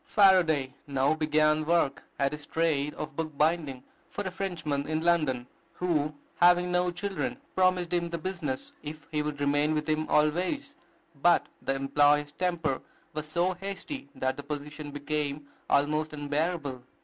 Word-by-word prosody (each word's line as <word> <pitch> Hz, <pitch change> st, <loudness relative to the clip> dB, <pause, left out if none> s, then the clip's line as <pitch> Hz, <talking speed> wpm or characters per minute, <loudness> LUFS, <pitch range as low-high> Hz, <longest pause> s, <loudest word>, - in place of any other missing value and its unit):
Faraday 175 Hz, -, +4 dB
now 140 Hz, +1 st, +2 dB
began 155 Hz, 0 st, +3 dB
work 165 Hz, -3 st, +2 dB, 0.2 s
at 140 Hz, -1 st, +2 dB
his 150 Hz, -1 st, -7 dB
trade 150 Hz, -3 st, +1 dB
of 155 Hz, -1 st, -6 dB
book 155 Hz, -2 st, -4 dB
binding 150 Hz, -4 st, +1 dB, 0.3 s
for 205 Hz, -, -4 dB
a 190 Hz, -, -3 dB
Frenchman 165 Hz, -7 st, -2 dB
in 155 Hz, 0 st, 0 dB
London, 155 Hz, -8 st, +2 dB, 0.3 s
who, 155 Hz, -4 st, 0 dB, 0.2 s
having 175 Hz, 0 st, +5 dB
no 180 Hz, 0 st, +2 dB
children, 190 Hz, +3 st, -3 dB, 0.2 s
promised 185 Hz, -2 st, +2 dB
him 170 Hz, -1 st, +1 dB
the 170 Hz, -, -3 dB
business, 260 Hz, -, -4 dB
if 150 Hz, 0 st, -8 dB
he 150 Hz, -1 st, +1 dB
would 150 Hz, -1 st, -3 dB
remain 145 Hz, +2 st, +2 dB
with 150 Hz, 0 st, -1 dB
him 155 Hz, 0 st, 0 dB
always; 185 Hz, -, +1 dB, 0.5 s
but 175 Hz, +2 st, +5 dB, 0.2 s
the 135 Hz, -, 0 dB
employer's 145 Hz, +2 st, +3 dB
temper 170 Hz, -6 st, -1 dB, 0.3 s
was 155 Hz, 0 st, -4 dB
so 175 Hz, +4 st, +1 dB
hasty 195 Hz, +9 st, -6 dB
that 130 Hz, 0 st, -1 dB
the -, -, -4 dB
position 150 Hz, +1 st, -6 dB
became 145 Hz, 0 st, -3 dB, 0.2 s
almost 150 Hz, +2 st, +2 dB
unbearable. 145 Hz, -2 st, -2 dB
155 Hz, 150 wpm, -29 LUFS, 145-175 Hz, 0.5 s, having